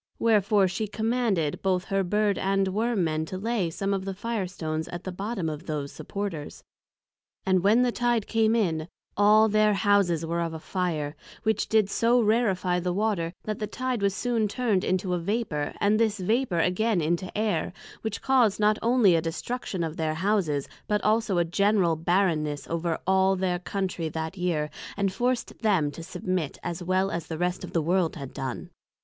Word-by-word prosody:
Wherefore 210 -3 +3
she 195 +4 -2
commanded 220 -7 0
both 185 -1 +1
her 195 0 0
Bird 205 +2 +1
and 195 0 +1
Worm 220 0 0
men 155 -1 0
to 185 - -6
lay 210 -3 -1
some 195 +4 -2
of 195 -1 -2
the 195 0 -4
Fire 220 -1 -2
stones 160 -3 -4
at 175 0 -7
the 185 - -4
bottom 195 -1 -3
of 155 +2 -5
those 145 -3 -3
Supporters, 195 -8 -5 0.8
and 185 -1 +3
when 220 +5 +5
the 245 - +2
Tide 240 -3 +1
came 225 0 +2
in, 165 -8 0 0.3
all 210 +2 +6
their 215 -1 +3
Houses 195 -5 +2
were 170 +1 -1
of 165 -1 -3
a - - -6
Fire, 160 -4 -2 0.3
which 220 0 0
did 220 -2 +4
so 230 +4 +3
rarifie 205 -6 +2
the 180 +1 -1
Water, 190 -4 0
that 215 -1 -4
the 210 - -2
Tide 255 -2 -2
was 200 -1 +1
soon 235 -2 0
turn'd 210 -3 0
into 185 0 0
a 175 - 0
Vapour, 170 -6 -2
and 210 +2 +3
this 220 -2 +2
Vapour 215 +1 0
again 180 +5 +2
into 170 +3 -1
Air; 215 -1 0 0.3
which 220 -2 -4
caused 250 -7 +3
not 210 0 +3
onely 230 -5 +4
a 165 - +3
destruction 185 +3 -3
of 160 0 -4
their 155 -2 -1
Houses, 170 -6 0 0.2
but 210 0 0
also 215 -2 +2
a 175 - +3
general 190 -1 +2
barrenness 160 -3 0
over 170 0 -1
all 190 +1 +3
their 180 -1 -1
Countrey 180 -2 -3
that 160 +3 -4
year, 170 -5 -1 0.3
and 195 -2 0
forced 245 +3 -1
them 190 -10 +2
to 165 - -9
submit, 180 -2 -3
as 175 0 -4
well 185 +2 +1
as 170 -2 -4
the 160 - -4
rest 180 +2 -1
of - - -8
the 165 - +1
World 175 0 +1
had 140 -5 -7
done. 130 -2 -5
190 Hz, 190 wpm, -26 LUFS, 170-215 Hz, 0.8 s, all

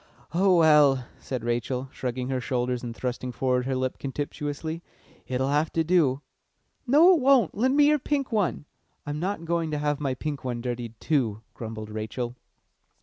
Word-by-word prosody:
"Oh 185 +1 +4
well," 150 -5 +5
said 125 -4 -5
Rachel, 120 +2 -2
shrugging 125 0 -4
her 130 -1 -1
shoulders 125 0 -1
and 120 -2 -6
thrusting 125 0 -3
forward 125 0 0
her 135 - 0
lip 130 0 -2
contemptuously, 145 +3 -4 0.5
"it'll 130 +1 0
have 150 +2 +1
to 165 - +2
do." 155 -6 +2 0.7
"No, 315 +9 +7
it 340 - +3
won't 260 -7 +4
lend 260 +6 +2
me 295 - +7
your 300 0 +3
pink 275 -1 -1
one." 205 -8 0 0.4
"I'm 145 +1 -3
not 180 -1 -3
going 165 -1 0
to 150 - -2
have 145 -1 -1
my 135 -3 -1
pink 145 +1 -4
one 125 -2 -3
dirtied, 120 -2 -5
too," 115 -8 0
grumbled 110 -2 -7
Rachel. 120 +3 -4
135 Hz, 170 wpm, -26 LUFS, 125-165 Hz, 0.7 s, No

